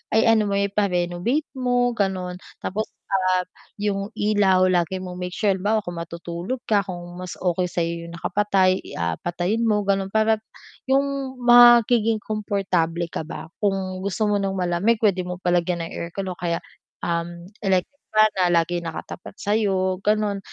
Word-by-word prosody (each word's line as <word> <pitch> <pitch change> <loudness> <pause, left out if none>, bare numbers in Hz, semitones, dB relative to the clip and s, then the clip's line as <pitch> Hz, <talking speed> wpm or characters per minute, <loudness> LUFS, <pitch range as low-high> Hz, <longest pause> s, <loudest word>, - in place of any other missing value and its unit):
ay 220 - +5
ano 215 -2 +2
mo-renovate 200 - 0
mo 245 -1 +2
ganon. 185 -4 -2 0.2
Tapos, 215 +3 -2 0.2
ah, 185 -1 +2 0.3
yung 205 +1 -2
ilaw 205 -3 +3
lagi 175 +1 +1
mong 180 0 -7
make 180 0 -5
sure 205 -2 +2
halimbawa 205 +3 0
kung 175 -2 -6
matutulog 170 +8 -5
ka 205 -3 +1
kung 175 0 -7
mas 185 -1 -6
okay 180 0 0
sa'yo 170 -1 -3
yung 170 - -9
nakapatay, 190 +1 +2
i - - -10
ah, 85 -1 -2
patayin 180 +7 -1
mo 210 -2 +2
ganon, 195 -1 +1
para 220 +2 +2 0.5
yung 275 0 0
magiging 240 -2 +6
komportable 180 -6 -1
ka 155 - -4
ba, 165 0 -8
kung 190 -2 -1
gusto 200 +3 -2
mo 210 -1 +2
ng 195 -1 -1
malamig 180 +5 +2
pwede 185 -4 +2
mo 180 - -3
palagyan 175 -1 +1
ng 165 - -7
aircon 185 +3 -4
o 180 - -9
kaya 170 -2 -2 0.4
um 170 0 -2 0.2
electric 190 0 +1 0.2
fan 215 0 +6
na 180 - +4 0.2
lagi 175 +1 -3
nakatapat 170 +3 -7
sa'yo 195 -3 0
ganon, 210 -1 +1
190 Hz, 160 wpm, -23 LUFS, 175-210 Hz, 0.5 s, magiging